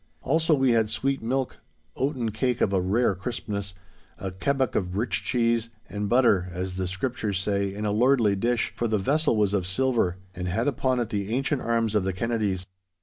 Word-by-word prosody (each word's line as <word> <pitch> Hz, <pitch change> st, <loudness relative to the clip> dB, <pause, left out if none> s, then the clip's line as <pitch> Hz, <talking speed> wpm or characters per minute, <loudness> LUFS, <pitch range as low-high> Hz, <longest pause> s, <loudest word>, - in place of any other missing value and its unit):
Also 160 Hz, +1 st, +3 dB
we 135 Hz, -2 st, +3 dB
had 110 Hz, -2 st, +3 dB
sweet 135 Hz, +5 st, -1 dB
milk, 130 Hz, +3 st, -1 dB, 0.4 s
oaten 130 Hz, -4 st, -1 dB
cake 125 Hz, +3 st, 0 dB
of 100 Hz, -, +2 dB
a 95 Hz, -, +3 dB
rare 100 Hz, +5 st, +2 dB
crispness, 100 Hz, -1 st, -4 dB, 0.4 s
a 95 Hz, -, -4 dB
kebbuck 130 Hz, +6 st, 0 dB
of 90 Hz, -1 st, -1 dB
rich 115 Hz, +4 st, 0 dB
cheese, 115 Hz, -2 st, +1 dB, 0.2 s
and 105 Hz, 0 st, -3 dB
butter, 115 Hz, -7 st, +3 dB
as 90 Hz, +1 st, -4 dB
the 95 Hz, -1 st, -1 dB
Scriptures 100 Hz, +1 st, -2 dB
say, 100 Hz, +1 st, 0 dB
in 105 Hz, +2 st, -4 dB
a 105 Hz, -, +1 dB
lordly 115 Hz, -2 st, +3 dB
dish, 120 Hz, +4 st, 0 dB
for 120 Hz, -, -1 dB
the 110 Hz, -1 st, +1 dB
vessel 145 Hz, +7 st, +2 dB
was 105 Hz, -2 st, +2 dB
of 95 Hz, -3 st, 0 dB
silver, 110 Hz, -3 st, +1 dB, 0.2 s
and 90 Hz, 0 st, -4 dB
had 105 Hz, +8 st, 0 dB
upon 130 Hz, -2 st, +1 dB
it 120 Hz, -3 st, -1 dB
the 100 Hz, -2 st, -2 dB
ancient 135 Hz, +3 st, 0 dB
arms 115 Hz, -2 st, 0 dB
of 105 Hz, -3 st, +2 dB
the 95 Hz, 0 st, -1 dB
Kennedies. 100 Hz, -3 st, -1 dB
110 Hz, 195 wpm, -26 LUFS, 95-125 Hz, 0.4 s, Also